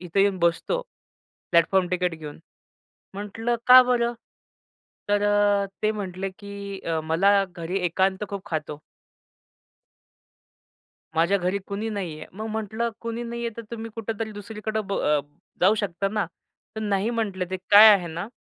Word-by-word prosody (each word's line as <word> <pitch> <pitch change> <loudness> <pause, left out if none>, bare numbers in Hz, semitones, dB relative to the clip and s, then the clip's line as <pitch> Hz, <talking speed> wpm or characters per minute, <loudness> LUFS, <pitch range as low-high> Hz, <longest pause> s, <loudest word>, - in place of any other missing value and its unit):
इथं 180 +2 -1
येऊन 195 -1 +2
बसतो, 170 - +1 0.7
प्लॅटफॉर्म 175 +2 +3
टिकट 180 -2 0
घेऊन." 150 -2 -9 0.8
म्हटलं 225 +4 -2
"का 255 0 +10
बरं?" 240 -1 +1 0.9
तर 205 0 +2
अ, 205 -1 +3 0.2
ते 215 - +3
म्हटले 195 -2 -4
की 200 -1 -7
"अ, 165 -1 -2
मला 195 +5 +3
घरी 175 +2 -3
एकांत 190 +3 +1
खूप 200 -1 -6
खातो." 150 -2 -4 2.3
"माझ्या 170 +5 +3
घरी 185 +2 0
कुणी 205 +2 -3
नाहीये." 180 -7 -5
मग 215 +4 -6
म्हटलं, 220 +2 -2
"कुणी 230 0 -4
नाहीये, 235 0 -4
तर 230 - -6
तुम्ही 225 -1 -6
कुठेतरी 225 -1 -4
दुसरीकडं 215 +1 -4
ब 195 - -2 0.6
जाऊ 195 +4 +5
शकता 195 -2 -2
ना?" 210 -1 -1 0.5
तर - - -3
"नाही." 205 +1 0
म्हटले 210 -6 -2
ते 190 - -1
"काय 210 +2 +10
आहे 180 -3 -1
ना, 170 +5 -5
200 Hz, 140 wpm, -25 LUFS, 185-220 Hz, 2.3 s, का